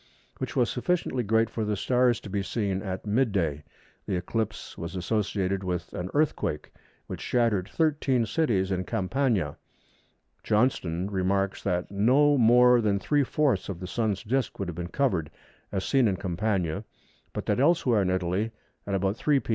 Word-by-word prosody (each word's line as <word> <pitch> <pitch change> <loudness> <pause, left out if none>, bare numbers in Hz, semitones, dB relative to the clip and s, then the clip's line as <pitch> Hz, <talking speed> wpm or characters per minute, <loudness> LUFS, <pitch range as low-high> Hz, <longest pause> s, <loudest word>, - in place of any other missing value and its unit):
which - - -4
was - - +3
sufficiently 175 -8 -1
great 110 +1 +2
for 115 0 -3
the 105 -1 -1
stars 125 +2 +2
to - - -10
be 100 0 -2
seen 95 -1 -2
at 95 0 -5
mid 115 +3 +2
day. 80 -7 0 0.5
The 95 - 0
eclipse 105 +4 -3
was 85 +3 -6
associated 95 0 -1
with 90 -2 -3
an 90 +1 -4
earthquake, 145 - 0 0.3
which - - -7
shattered 110 -6 +1
thirteen 145 -6 +1
cities 105 -7 0
in 95 -1 -1
Campania. 115 +2 0 0.9
Johnston 100 -5 +1
remarks 95 0 0
that 90 -1 -1
no 130 +9 +4
more 125 0 +6
than 105 -2 +2
three 145 +8 +1
fourths 145 -2 0
of 90 -4 -5
the 90 - -6
Sun's 105 0 -1
disc 125 +2 -1
would 100 - -3
have 85 - -6
been 85 0 -4
covered, 90 - 0 0.4
as 95 -2 -2
seen 135 -4 +3
in 100 - +1
Campania, 95 -1 -1 0.5
but - - -5
that - - +1
elsewhere 135 -7 +3
in 95 - 0
Italy, 95 +4 0 0.4
at 100 - 0
about 95 +2 0
3 145 +1 +2
p. - - -13
105 Hz, 170 wpm, -27 LUFS, 95-125 Hz, 0.9 s, more